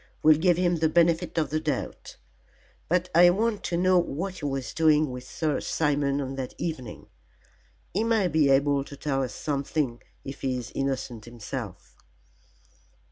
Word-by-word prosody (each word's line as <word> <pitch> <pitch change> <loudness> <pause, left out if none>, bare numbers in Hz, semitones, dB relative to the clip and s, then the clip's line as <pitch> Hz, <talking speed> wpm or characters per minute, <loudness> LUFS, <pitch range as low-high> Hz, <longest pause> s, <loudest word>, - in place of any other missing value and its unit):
We'll 155 -1 +6
give 175 0 +3
him 175 -1 +2
the 160 0 +2
benefit 170 0 +2
of 155 -3 0
the 155 - +1
doubt. - - -4 0.7
But 180 +1 +1
I 175 +2 +7
want 210 +3 0
to 170 - -1
know 185 +1 +4
what 180 +3 -3
he 145 - -5
was 135 -2 -3
doing 155 -3 +3
with 125 0 -7
Sir 155 +2 -1
Simon 145 -2 0
on 135 -1 -3
that 130 -2 -5
evening. 130 -10 -5 0.9
He 210 - +1
may 225 -4 +2
be 155 -4 +3
able 140 +1 +3
to 140 - -11
tell 135 -2 -1
us 130 - -4
something 140 -3 -2 0.2
if 135 0 -7
he 130 -1 -1
is 125 -1 -7
innocent 130 -5 -3
himself." 120 -2 -8
150 Hz, 165 wpm, -26 LUFS, 135-170 Hz, 0.9 s, I